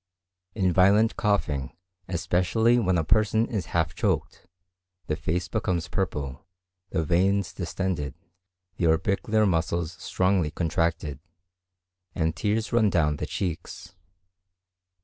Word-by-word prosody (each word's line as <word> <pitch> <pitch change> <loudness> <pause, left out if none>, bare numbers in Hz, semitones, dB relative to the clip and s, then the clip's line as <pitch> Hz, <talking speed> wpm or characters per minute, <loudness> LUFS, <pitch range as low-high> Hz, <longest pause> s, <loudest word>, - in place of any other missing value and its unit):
In 95 -4 +1
violent 100 +5 +4
coughing 85 - -1 0.3
especially 95 +7 +2
when 95 -5 +2
a 80 - +1
person 110 +5 +3
is 100 -9 -3
half 85 0 0
choked, 90 - -2 0.6
the 75 - -1
face 85 +3 -2
becomes 85 +1 -1
purple, 75 -8 -3 0.5
the 80 -3 0
veins 95 +4 +1
distended, 85 -6 -3 0.6
the 85 - +1
orbicular 100 +6 +2
muscles 85 -2 0
strongly 90 -4 +1
contracted, 80 -3 -1 1.0
and 80 -1 0
tears 105 +6 -1
run 110 -3 +4
down 75 -5 +1
the - - -4
cheeks. 90 -1 -5
90 Hz, 110 wpm, -26 LUFS, 80-100 Hz, 1.0 s, violent